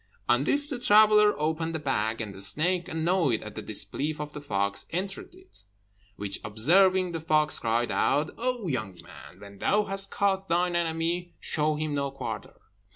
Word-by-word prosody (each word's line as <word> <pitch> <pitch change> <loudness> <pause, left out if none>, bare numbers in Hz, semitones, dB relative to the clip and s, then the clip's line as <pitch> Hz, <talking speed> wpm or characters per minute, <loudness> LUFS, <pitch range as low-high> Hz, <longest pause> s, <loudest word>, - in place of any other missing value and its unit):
On 120 +3 +3
this 285 - +2
the 255 - -3
traveller 210 -5 +5
opened 160 +2 -1
the - - -2
bag, 115 -6 -1
and 105 -3 -5
the 95 - -11
snake, 170 - 0
annoyed 160 - 0
at - - -8
the - - -6
disbelief 150 +2 -1
of 150 0 -6
the 150 - -7
fox, 100 -6 -2
entered 195 - -5
it; 370 0 -13 0.6
which 100 -1 -4
observing, 180 - +3
the 165 - -4
fox 155 -1 +2
cried 115 +1 0
out, 150 +2 +1
"O 245 -4 -2
young 110 - -3
man, 90 - -13
when 100 -1 -12
thou 210 +1 +2
hast 195 0 -1
caught 195 -2 0
thine 175 +1 +1
enemy, 170 +1 -1
show 155 -1 0
him 155 0 -3
no 140 -1 -1
quarter. 135 - -6
160 Hz, 175 wpm, -27 LUFS, 130-190 Hz, 0.6 s, traveller